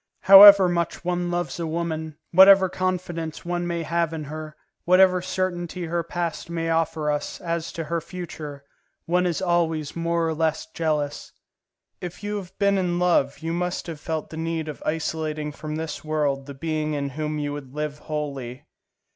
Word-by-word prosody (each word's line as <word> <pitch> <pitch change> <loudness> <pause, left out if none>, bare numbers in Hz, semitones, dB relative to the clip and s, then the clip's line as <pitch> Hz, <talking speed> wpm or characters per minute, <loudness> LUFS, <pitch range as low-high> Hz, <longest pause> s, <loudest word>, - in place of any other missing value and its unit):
However 200 -1 +10
much 170 0 -2
one 175 0 -1
loves 175 0 -2
a 165 - -2
woman, 160 -1 -3
whatever 190 +1 +8
confidence 175 -4 -3
one 175 0 -2
may 170 -1 -2
have 170 0 -1
in 160 -1 -4
her, 155 +1 -7 0.3
whatever 185 0 +5
certainty 180 -1 -3
her 170 +1 -1
past 170 0 -4
may 165 -1 -2
offer 160 -2 0
us 145 - -3
as 170 -1 -3
to 165 - -4
her 165 +2 -2
future, 155 -5 -8 0.4
one 180 +1 +2
is 175 +1 -2
always 165 -4 0
more 170 0 0
or 160 - -1
less 160 0 -1
jealous. 155 -3 -3 0.7
If 180 +2 -7
you 205 0 -2
have 190 -1 -9
been 200 -1 +2
in 175 -2 0
love, 175 -6 +2
you 165 0 -2
must 180 +1 -2
have 165 -4 -7
felt 160 +1 -4
the 160 - -7
need 165 -1 -2
of 150 - -7
isolating 155 -1 -2
from 155 +1 -6
this 160 -1 -5
world 145 -3 -1
the 140 - -8
being 155 +1 -2
in 140 -1 -2
whom 150 +2 -3
you 145 -1 -3
would 140 -2 -9
live 150 -1 -3
wholly. 140 -4 -5
165 Hz, 175 wpm, -24 LUFS, 155-175 Hz, 0.7 s, However